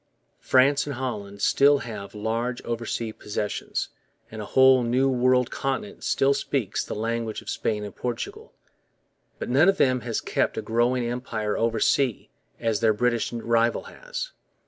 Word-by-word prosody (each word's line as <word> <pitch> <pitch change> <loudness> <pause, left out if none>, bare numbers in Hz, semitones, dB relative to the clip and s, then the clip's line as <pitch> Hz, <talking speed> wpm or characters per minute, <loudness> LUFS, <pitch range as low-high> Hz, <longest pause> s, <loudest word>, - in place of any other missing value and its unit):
France 140 +3 +3
and 140 - -3
Holland 105 -6 -5
still 145 +1 +5
have 105 -3 -7
large 115 +4 -2
oversea 115 -1 -3
possessions; 105 -1 -3 0.4
and 110 0 -6
a - - -5
whole 130 +1 +5
new 125 +3 +2
world 125 -1 +2
continent 170 +10 -3
still 135 +1 +3
speaks 140 -6 -1
the - - -5
languages 115 0 -2
of - - -8
Spain 105 -1 -1
and 105 -2 -8
Portugal. 120 -2 -5 0.9
But - - -5
none 145 +9 +5
of 195 - +2
them 130 -5 +3
has 115 -1 -2
kept - - -1
a - - 0
growing 120 +2 +1
empire 120 -3 -2
oversea 115 +2 +1 0.3
as 115 -3 0
their 110 -1 +3
British 120 0 +1
rival 115 0 +1
has. - - -7
120 Hz, 150 wpm, -25 LUFS, 110-130 Hz, 0.9 s, still